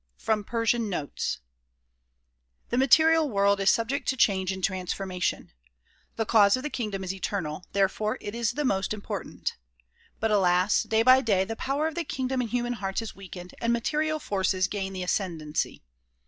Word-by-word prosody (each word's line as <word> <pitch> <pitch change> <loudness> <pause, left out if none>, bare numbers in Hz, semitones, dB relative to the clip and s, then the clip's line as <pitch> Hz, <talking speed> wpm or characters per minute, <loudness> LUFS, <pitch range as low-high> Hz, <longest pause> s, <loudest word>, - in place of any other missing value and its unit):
From 215 -2 0
Persian 230 0 0
Notes 155 -7 -3 1.3
THE 240 - -1
material 315 +3 +5
world 200 -2 +2
is 195 - +4
subject 235 +5 0
to 265 - +1
change 190 -4 +2
and 190 -1 -6
transformation. 185 -1 -2 0.6
The 225 - -1
cause 210 0 +5
of 255 - -6
the 300 - -3
kingdom 210 -5 -3
is 190 0 -3
eternal; 185 -3 -4
therefore 200 +2 +1
it 205 - -6
is 235 -2 0
the 295 0 -2
most 195 -3 0
important. 205 - -5 0.6
But 225 0 0
alas! 185 -1 +3
day 220 0 +1
by 255 +2 +7
day 200 -6 +2
the 225 +3 -4
power 275 +6 -1
of 320 - -4
the 340 +2 -2
kingdom 260 -3 -2
in 240 - -2
human 240 +1 -1
hearts 195 -1 -3
is 225 - -7
weakened 180 -2 -10
and 235 - +1
material 305 +6 0
forces 190 -7 0
gain 195 -1 -4
the 185 -1 -4
ascendency. 165 - -2
210 Hz, 170 wpm, -27 LUFS, 190-240 Hz, 1.3 s, by